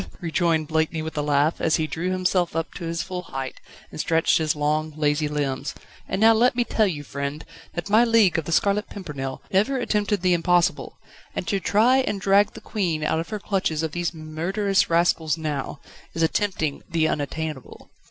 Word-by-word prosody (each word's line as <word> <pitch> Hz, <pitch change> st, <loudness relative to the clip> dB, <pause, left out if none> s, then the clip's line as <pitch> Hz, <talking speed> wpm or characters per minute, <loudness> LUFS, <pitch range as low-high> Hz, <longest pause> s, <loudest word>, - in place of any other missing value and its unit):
rejoined 165 Hz, -2 st, 0 dB
Blakeney 160 Hz, 0 st, 0 dB
with 160 Hz, -, -6 dB
a 150 Hz, -, 0 dB
laugh, 145 Hz, +2 st, +1 dB
as 160 Hz, -, +3 dB
he 160 Hz, -, 0 dB
drew 165 Hz, +3 st, -3 dB
himself 185 Hz, -2 st, 0 dB
up 165 Hz, 0 st, -2 dB
to 170 Hz, -, -6 dB
his 165 Hz, 0 st, -2 dB
full 180 Hz, 0 st, -5 dB
height, 135 Hz, -6 st, -6 dB, 0.3 s
and -, -, -9 dB
stretched 165 Hz, +1 st, +2 dB
his 155 Hz, -1 st, 0 dB
long, 155 Hz, +1 st, 0 dB
lazy 150 Hz, 0 st, +1 dB
limbs. 145 Hz, -3 st, -2 dB, 0.3 s
"And -, -, -2 dB
now 225 Hz, +1 st, +7 dB
let 235 Hz, +3 st, +3 dB
me 245 Hz, -, +2 dB
tell 220 Hz, -2 st, +1 dB
you, 150 Hz, -6 st, -4 dB
friend, 140 Hz, +2 st, -5 dB, 0.3 s
that 175 Hz, -, -3 dB
my 215 Hz, +3 st, +5 dB
League 225 Hz, -8 st, +4 dB
of 160 Hz, -, -6 dB
The 170 Hz, -, -4 dB
Scarlet 200 Hz, +6 st, +1 dB
Pimpernel 140 Hz, -9 st, -6 dB
never 215 Hz, +8 st, +2 dB
attempted 210 Hz, -5 st, 0 dB
the 180 Hz, -1 st, +4 dB
impossible, 175 Hz, +1 st, +1 dB, 0.4 s
and -, -, -3 dB
to 200 Hz, -, +1 dB
try 225 Hz, +7 st, +3 dB
and 235 Hz, -6 st, 0 dB
drag 200 Hz, +2 st, +3 dB
the 220 Hz, -, -10 dB
Queen 175 Hz, -9 st, -2 dB
out 155 Hz, +1 st, +1 dB
of 165 Hz, -, -5 dB
the 215 Hz, -, -3 dB
clutches 185 Hz, -6 st, -1 dB
of 160 Hz, -, -2 dB
these 175 Hz, +1 st, -2 dB
murderous 175 Hz, +6 st, -1 dB
rascals 165 Hz, -2 st, +2 dB
now, 150 Hz, -3 st, -4 dB, 0.4 s
is 165 Hz, -, 0 dB
attempting 160 Hz, -4 st, 0 dB
the 165 Hz, -2 st, +2 dB
unattainable." 155 Hz, -2 st, -4 dB
165 Hz, 190 wpm, -24 LUFS, 155-195 Hz, 0.4 s, now